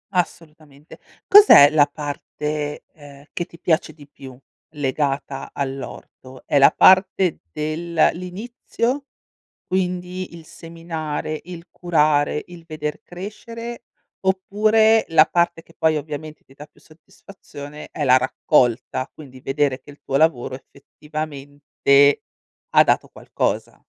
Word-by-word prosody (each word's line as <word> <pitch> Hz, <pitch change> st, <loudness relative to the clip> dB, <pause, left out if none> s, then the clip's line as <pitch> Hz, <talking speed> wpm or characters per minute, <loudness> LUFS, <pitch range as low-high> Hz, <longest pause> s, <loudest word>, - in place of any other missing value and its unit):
Assolutamente. 155 Hz, -4 st, -5 dB, 0.3 s
Cos'è 400 Hz, -, +9 dB
la 150 Hz, -2 st, +4 dB
parte, 150 Hz, 0 st, -5 dB
ehm, 145 Hz, -2 st, -15 dB
che 175 Hz, -, -3 dB
ti 170 Hz, -, -16 dB
piace 160 Hz, -2 st, 0 dB
di 145 Hz, -2 st, -16 dB
più, 130 Hz, -3 st, -13 dB, 0.4 s
legata 140 Hz, -1 st, -2 dB
all'orto? 135 Hz, -1 st, -7 dB
È 145 Hz, -, +2 dB
la 140 Hz, -, +8 dB
parte 185 Hz, -2 st, +4 dB
del 155 Hz, -, -4 dB, 0.2 s
l'inizio, 230 Hz, -, -4 dB, 0.6 s
quindi 180 Hz, -1 st, -3 dB
il 165 Hz, -2 st, -12 dB
seminare, 160 Hz, -2 st, -6 dB
il 175 Hz, 0 st, -10 dB
curare, 150 Hz, -4 st, +1 dB
il 175 Hz, -2 st, -13 dB
veder 150 Hz, -2 st, -5 dB
crescere 230 Hz, +6 st, -8 dB, 0.4 s
oppure, 215 Hz, +4 st, +3 dB
la 160 Hz, -1 st, +5 dB
parte 170 Hz, -1 st, 0 dB
che 165 Hz, -, -22 dB
poi 160 Hz, -1 st, +2 dB
ovviamente 155 Hz, +1 st, -8 dB
ti 135 Hz, -, -21 dB
dà 145 Hz, -, -11 dB
più -, -, -27 dB
soddisfazione, 150 Hz, -2 st, -13 dB
è 150 Hz, -, -5 dB
la 130 Hz, -1 st, +6 dB
raccolta, 130 Hz, -1 st, 0 dB
quindi 130 Hz, -4 st, -13 dB
vedere 135 Hz, 0 st, -1 dB
che -, -, -15 dB
il 145 Hz, -, -17 dB
tuo 135 Hz, -, -2 dB
lavoro 135 Hz, -4 st, +1 dB
effettivamente 145 Hz, 0 st, -1 dB, 0.5 s
ha -, -, +6 dB
dato -, -, +1 dB
qualcosa? -, -, -4 dB
155 Hz, 120 wpm, -21 LUFS, 145-175 Hz, 0.6 s, Cos'è